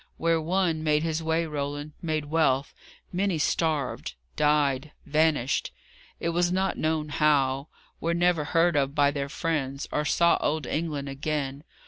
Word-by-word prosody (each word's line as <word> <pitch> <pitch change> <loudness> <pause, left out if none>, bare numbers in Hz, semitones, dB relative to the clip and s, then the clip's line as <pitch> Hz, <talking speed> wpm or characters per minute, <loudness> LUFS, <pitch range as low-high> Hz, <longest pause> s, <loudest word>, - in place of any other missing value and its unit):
Where 165 0 +2
one 170 -1 0
made 150 0 +2
his 165 -1 -1
way, 160 +1 0
Roland 145 0 -4
made 155 -3 -1
wealth 145 -3 +1 0.4
many 190 -1 +1
starved; 150 - -1 0.2
died; 150 -1 +1
vanished, 150 -4 +1 0.5
it 170 - -1
was 175 +1 +1
not 190 +1 0
known 155 -1 -1
how; 140 -2 +2 0.3
were 170 +1 0
never 170 -3 +2
heard 165 +2 +2
of 140 0 +1
by 145 -1 +4
their 140 -1 -3
friends, 140 -4 -2
or 150 - 0
saw 170 +3 +3
old 150 -1 0
England 150 -1 -2
again. 140 0 -3
155 Hz, 145 wpm, -27 LUFS, 145-165 Hz, 0.5 s, by